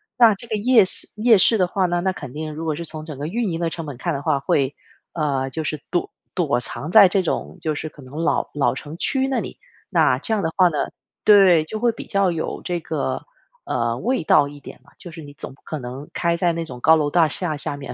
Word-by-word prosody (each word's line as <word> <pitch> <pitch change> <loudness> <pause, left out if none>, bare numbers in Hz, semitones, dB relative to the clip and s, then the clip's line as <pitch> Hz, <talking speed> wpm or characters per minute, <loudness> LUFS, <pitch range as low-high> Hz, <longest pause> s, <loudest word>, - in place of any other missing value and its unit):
那 230 -4 +6
这 235 - -11
个 220 - -2
夜 225 -2 +5
市 - - +3
夜 220 0 +5
市 225 +4 +4
的 185 - +3
话 185 0 0
呢， 175 0 0
那 190 - +1
肯 145 -8 -8
定 155 0 -5
如 160 +2 -6
果 155 - -1
是 170 +2 -6
从 155 0 -6
整 155 -4 -8
个 145 - -5
运 215 +5 -1
营 165 - -3
的 170 -1 0
成 165 -3 -6
本 135 - -7
看 170 +5 -2
的 140 - -3
话， 145 -2 +1
会 135 0 0 0.4
呃， 140 -4 -1
就 160 +4 -4
是 155 -1 -4
躲 175 - -1 0.2
躲 145 -9 +1
藏 150 +5 -6
在 205 -1 +9
这 190 0 +1
种 - - -3
就 155 -1 -1
是 155 - -5
可 150 - -16
能 130 +4 -11
老 165 - 0
老 145 - +1
城 155 +2 -8
区 265 +7 0
那 265 - 0
里。 - - -7 0.3
那 - - +3
这 225 - -2
样 205 - 0
的 160 - -1
话 185 -2 +6
呢 150 -4 -1 0.3
对， 190 -6 +6
就 215 +8 -6
会 235 0 +2
比 - - -9
较 195 -3 +1
有 160 -1 -4
这 175 -2 -2
个 - - -3 0.4
呃， - - -1
味 255 -6 0
道 145 -2 +4
一 145 0 -12
点 125 - -12
吧， 140 - -23
就 175 - -10
是 165 0 -10
你 145 -1 -11
总 135 - -8
不 135 - -24
可 155 - -5
能 130 +3 -8
开 170 -1 0
在 170 0 +1
那 165 0 -3
种 125 -5 -10
高 160 0 +6
楼 150 -2 0
大 165 -1 +3
厦 160 -1 -2
下 145 0 -5
面。 140 - -7
165 Hz, 280 characters per minute, -22 LUFS, 145-190 Hz, 0.4 s, 在